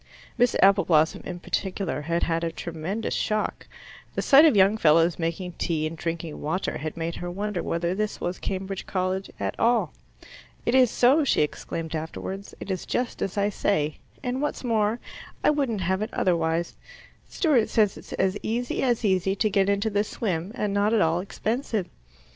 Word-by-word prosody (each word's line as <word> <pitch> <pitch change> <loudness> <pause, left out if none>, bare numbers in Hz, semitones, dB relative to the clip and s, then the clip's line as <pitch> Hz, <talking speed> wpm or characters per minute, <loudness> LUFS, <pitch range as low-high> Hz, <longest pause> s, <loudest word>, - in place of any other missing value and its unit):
Miss 245 -1 +3
Appleblossom 180 -5 +4
in 175 -1 -5
particular 185 -8 -2
had 170 +3 -1
had 165 0 0
a 165 - -1
tremendous 170 +8 -4
shock. 215 0 -1 0.5
The - - -1
sight 285 +3 +8
of 310 - +5
young 195 +2 +5
fellows 165 -2 +4
making 170 +2 -2
tea 155 -2 0
and 155 +1 -3
drinking 165 -1 -4
water 160 +6 -2
had 155 +2 -5
made 165 0 -3
her 175 - -5
wonder 200 +1 -3
whether 170 +1 -1
this 215 +2 -2
was 175 +1 -3
Cambridge 195 0 -4
College 185 0 -1
at - - -1
all. 235 +1 +2 0.7
"It 235 - +1
is 260 -2 +6
so," 265 +7 +4
she 270 - +3
exclaimed 160 +2 -4
afterwards. 190 +5 -6
"It 195 - -5
is 185 - -4
just 245 -1 -2
as 195 - -2
I 200 0 +2
say; 155 -7 0 0.2
and 250 +2 -2
what's 295 - -2
more, 225 -1 +1 0.4
I - - +5
wouldn't 265 -9 -1
have 190 +2 0
it 215 - -3
otherwise; 165 -1 0 0.5
Stewart 275 - +2
says 210 -4 +2
it's - - -10
as 190 +1 0
easy 240 +2 -2
as 240 -3 +1
easy 190 -1 +2
to 215 +1 +1
get 195 -1 +3
into 200 +2 +1
the 205 0 +2
swim, 190 -4 -3
and 210 -5 -1
not 205 +2 +2
at 220 - +3
all 165 +1 +2
expensive." 215 +2 -2
195 Hz, 180 wpm, -26 LUFS, 170-220 Hz, 0.7 s, sight